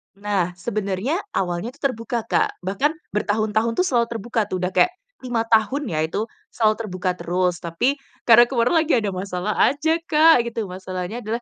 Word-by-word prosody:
Nah, 195 -3 -1
sebenarnya, 200 - -2 0.2
awalnya 185 +6 -2
itu - - -26
terbuka, 235 -2 -1
Kak. - - 0
Bahkan 200 +11 +1 0.2
bertahun-tahun 215 +2 0
tuh 365 - +2
selalu 240 -6 +2
terbuka 230 +2 -2
tuh. 185 - -3
Udah 180 +1 -1
kayak 360 - +3 0.3
5 240 -2 0
tahun 230 +6 +2
ya 155 -2 -2
itu, 205 +6 -2 0.3
selalu 215 -2 +3
terbuka 185 -1 -2
terus. 180 0 0
Tapi, 175 - 0 0.3
karena 240 0 +7
kemarin 240 +2 +1
lagi 325 0 +2
ada 210 -4 0
masalah 185 +2 -3
aja 315 +4 +1
Kak 310 -5 +5
gitu. 225 -2 -3
Masalahnya 185 +3 -5
adalah, 225 +3 -3
215 Hz, 170 wpm, -22 LUFS, 185-245 Hz, 0.3 s, karena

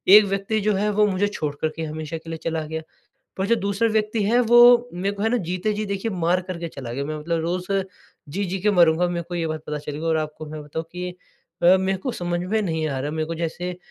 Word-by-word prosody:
एक 210 -1 +9
व्यक्ति 195 +2 -1
जो 210 +1 +2
है 210 +2 +1
वो 210 +1 +4
मुझे 200 +1 +1
छोड़ 150 -8 -3
कर 155 - +2
के 165 - -4
हमेशा 155 +1 -4
के 165 +1 -11
लिए 165 - -4
चला 160 -1 -1
गया। 160 0 -4 0.6
पर 190 - 0
जो 235 - +4
दूसरा 200 +2 +1
व्यक्ति 215 0 0
है 235 +4 +4
वो 240 +1 +7
मेरे 195 +3 -1
को 200 - -4
है 225 - +3
न - - +1
जीते 185 +5 -1
जी 215 0 -2
देखिए 200 +3 -2
मार 175 0 +1
कर 180 -2 -4
के 170 - -3
चला 130 -6 -7
गया। 140 +1 -2
मैं 155 +1 -3
मतलब 165 +2 -1
रोज़ 180 +3 -2 0.6
जी-जी 190 +3 -2
के 210 +2 +3
मरूँगा 175 -2 +4
मेरे 170 -1 -2
को 175 - -5
ये 165 -1 -1
बात 155 -1 -4
पता 150 0 -3
चलेगी 150 +2 -6
और 160 -1 +2
आपको 155 0 -5
मैं 150 0 -7
बताऊँ 160 +2 -5
कि 180 0 -4 0.5
अ, 180 +2 +7
मेरे 190 0 0
को 250 +5 -3
समझ 175 0 -2
में 210 +5 0
नहीं 160 -4 -1
आ 135 -2 -2
रहा। 145 +2 -2
मेरे 155 0 -2
को 165 - -4
जैसे 175 +2 -3
180 Hz, 260 wpm, -23 LUFS, 160-200 Hz, 0.6 s, एक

